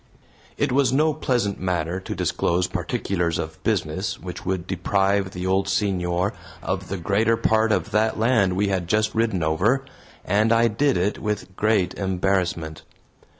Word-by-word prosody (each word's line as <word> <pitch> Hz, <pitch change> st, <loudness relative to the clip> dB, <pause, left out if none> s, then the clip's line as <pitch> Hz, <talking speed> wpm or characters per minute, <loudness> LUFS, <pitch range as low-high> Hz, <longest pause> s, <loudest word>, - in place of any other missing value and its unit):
It 145 Hz, -2 st, 0 dB
was 130 Hz, -1 st, +3 dB
no 155 Hz, +4 st, +3 dB
pleasant 120 Hz, -9 st, -1 dB
matter 90 Hz, -1 st, -1 dB
to 95 Hz, -, -6 dB
disclose 90 Hz, +1 st, 0 dB
particulars 85 Hz, -3 st, -2 dB
of 80 Hz, -2 st, -5 dB
business 95 Hz, -2 st, -1 dB
which 90 Hz, 0 st, -8 dB
would 95 Hz, -2 st, -1 dB
deprive 95 Hz, +1 st, +1 dB
the 90 Hz, -1 st, -6 dB
old 95 Hz, +1 st, +1 dB
senor 95 Hz, -1 st, 0 dB, 0.3 s
of -, -, -3 dB
the 100 Hz, -, -3 dB
greater 105 Hz, +6 st, +1 dB
part 110 Hz, -1 st, +2 dB
of 100 Hz, 0 st, 0 dB
that 110 Hz, +1 st, +1 dB
land 110 Hz, -5 st, +3 dB
we 100 Hz, +1 st, +1 dB
had 95 Hz, -3 st, -1 dB
just 110 Hz, +3 st, +1 dB
ridden 110 Hz, -6 st, 0 dB
over, 105 Hz, +13 st, +1 dB, 0.4 s
and 105 Hz, +4 st, +2 dB
I 115 Hz, 0 st, +4 dB
did 135 Hz, +4 st, +1 dB
it 95 Hz, +4 st, 0 dB
with 105 Hz, -3 st, -4 dB
great 105 Hz, -3 st, +1 dB
embarrassment. 90 Hz, -4 st, -1 dB
100 Hz, 155 wpm, -23 LUFS, 90-110 Hz, 0.4 s, I